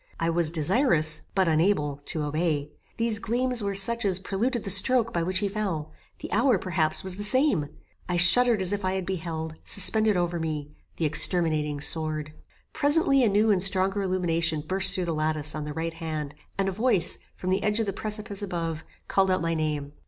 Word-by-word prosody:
I 165 0 0
was 165 -1 +1
desirous, 160 - +1
but 190 -2 +2
unable, 155 -3 +1
to 155 - -3
obey; 150 -1 -2 0.3
these 230 -2 0
gleams 245 +2 +2
were 200 -1 -3
such 235 +4 +2
as 190 -3 +2
preluded 220 +5 -2
the 195 - -1
stroke 230 +4 +3
by 170 - -1
which 185 +2 -1
he 205 - +1
fell; 190 -7 -4 0.3
the - - -8
hour, 230 +3 +2
perhaps, 170 -4 -1
was 190 -1 -2
the 205 - -4
same 210 - +1 0.4
I 180 - 0
shuddered 215 +4 +4
as 185 +2 0
if 205 -1 -4
I 185 0 -1
had 190 -1 -3
beheld, 160 -3 -5
suspended 215 +1 +3
over 175 -1 -2
me, 150 -2 -5 0.3
the 165 - -1
exterminating 155 -2 +3
sword. 155 -1 0 0.4
Presently 290 -2 +4
a 230 - +3
new 210 +2 +2
and 190 -3 +1
stronger 195 +1 +3
illumination 170 -4 0
burst 190 +2 +2
through 185 - -2
the 170 - -3
lattice 155 -1 0
on 150 -1 -5
the 150 - -6
right 165 +1 -4
hand, 155 -3 -6 0.2
and 195 0 -1
a - - -1
voice, 195 -4 0 0.2
from 185 - -4
the 190 +2 0
edge 210 +2 0
of 225 - 0
the 195 - -4
precipice 210 -1 -5
above, 165 -5 -4 0.2
called 190 -1 +1
out 185 -2 0
my 165 0 -1
name. 150 -3 -3
185 Hz, 195 wpm, -25 LUFS, 160-205 Hz, 0.4 s, shuddered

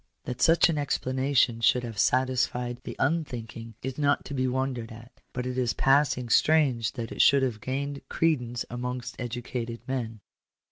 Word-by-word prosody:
That 125 - -6
such 165 +1 +6
an 160 -3 -1
explanation 130 -3 +1
should 125 +2 +3
have 115 -4 -6
satisfied 125 0 +1
the - - -6
unthink 135 -6 -1
ing, 115 -1 -9
is 130 +2 -4
not 145 -1 +2
to - - -6
be 130 -1 0
wondered 125 -2 -2
at; 115 +2 -13
but 125 0 -4
it 125 0 -2
is 120 -2 +1
passing 135 -2 +3
strange 135 -7 +3
that 115 -1 -5
it - - 0
should 140 -1 +5
have 115 -5 -2
gained 140 +2 -3
credence 125 -7 0
amongst 125 +1 -4
educated 120 -1 -4
men. 115 -5 -3
125 Hz, 170 wpm, -27 LUFS, 120-135 Hz, -, such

